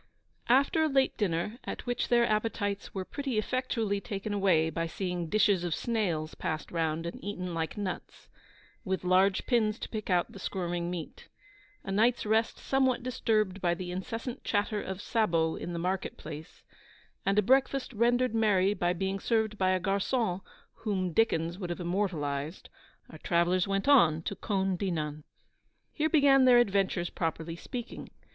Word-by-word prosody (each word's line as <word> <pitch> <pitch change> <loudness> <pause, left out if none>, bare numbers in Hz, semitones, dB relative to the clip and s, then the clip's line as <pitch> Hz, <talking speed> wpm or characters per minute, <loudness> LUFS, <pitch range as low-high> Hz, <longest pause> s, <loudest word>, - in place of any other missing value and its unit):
_ - - -36 0.5
After 275 +6 +4
a - - +3
late 270 -1 +2
dinner, 205 +3 -1
at - - -6
which 245 -1 -1
their 240 -1 +4
appetites 210 -2 -1
were 190 -1 -4
pretty 275 -2 -3
effectually 220 -3 -1
taken 200 +1 -4
away 175 -6 +3
by 165 0 -2
seeing 180 -1 -3
dishes 200 -3 +3
of 170 -3 -1
snails 175 -10 -1
passed 155 0 -4
round 165 -1 -1
and 170 - -6
eaten 180 -3 -4
like 165 +2 -3
nuts, 200 -3 -5 0.6
with 190 0 -2
large 185 +2 +3
pins 220 -4 +2
to - - -6
pick 215 -2 -5
out 175 -2 +2
the 195 - -11
squirming 175 -2 -3
meat; 175 -3 -7 0.6
a 195 - -5
night's 230 +5 +2
rest 220 +1 +1
somewhat 260 -2 +1
disturbed 215 -6 0
by 175 -1 +2
the 180 0 -5
incessant 225 +7 -5
clatter 210 0 0
of 190 +1 -6
sabots 165 -8 +1
in 175 - -4
the 170 - -4
market 185 +3 -2
place, 155 +3 -9 0.6
and 195 +1 +1
a 210 - +5
breakfast 265 +3 +2
rendered 240 +2 +2
merry 205 -3 +3
by 175 -3 0
being 190 +2 -2
served 220 0 0
by 185 -2 +1
a 185 0 +2
garçon 195 +1 0 0.4
whom 190 -5 -2
Dickens 170 -5 +1
would 180 -3 -4
have 175 - -4
immortalised, 170 -5 -2 0.4
our 155 - -11
travellers 175 +3 +2
went 195 +3 -1
on 165 - +5
to 200 - -3
Caulnes 190 -3 -1
Dinan. 155 -5 -3 0.7
Here 310 0 0
began 275 -4 +5
their 250 -1 +7
adventures, 195 -6 +1
properly 165 0 -3
speaking. 240 +7 -7
195 Hz, 165 wpm, -30 LUFS, 175-225 Hz, 0.7 s, their